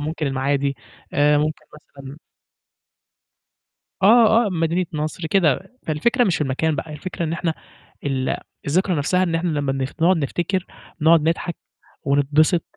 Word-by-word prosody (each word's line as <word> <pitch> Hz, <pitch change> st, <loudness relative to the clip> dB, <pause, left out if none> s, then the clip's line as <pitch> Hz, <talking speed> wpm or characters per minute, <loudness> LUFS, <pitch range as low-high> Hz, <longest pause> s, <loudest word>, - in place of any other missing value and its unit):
ممكن 155 Hz, +1 st, -3 dB
المعادي، 140 Hz, +1 st, 0 dB, 0.4 s
آآ 150 Hz, -3 st, +3 dB
ممكن 150 Hz, +1 st, -2 dB
مثلًا 140 Hz, -2 st, -12 dB, 1.9 s
آه، 225 Hz, +2 st, +6 dB
آه -, -, 0 dB
مدينة 170 Hz, +1 st, 0 dB
نصر 155 Hz, +2 st, -3 dB
كده، 185 Hz, -, +1 dB
فالفكرة 235 Hz, -, +1 dB
مش 185 Hz, -6 st, +1 dB
في -, -, -6 dB
المكان 145 Hz, +3 st, -1 dB
بقى، 155 Hz, +3 st, -5 dB
الفكرة 170 Hz, +3 st, -5 dB
إن 160 Hz, -, -2 dB
إحنا 165 Hz, -1 st, -1 dB, 0.5 s
ال 135 Hz, -2 st, -1 dB, 0.3 s
الذكرى 180 Hz, +6 st, +1 dB
نَفْسَها 180 Hz, +6 st, +1 dB
إن 170 Hz, -3 st, 0 dB
إحنا 170 Hz, +2 st, 0 dB
لمّا 145 Hz, -4 st, -1 dB
نخ 135 Hz, 0 st, -3 dB
نقعد 180 Hz, +3 st, +5 dB
نفتكر، 175 Hz, +5 st, -2 dB, 0.3 s
نقعد 160 Hz, +1 st, +5 dB
نضحك، 170 Hz, +1 st, -2 dB, 0.5 s
ونتبسط 145 Hz, +4 st, +2 dB
155 Hz, 140 wpm, -21 LUFS, 145-180 Hz, 1.9 s, آه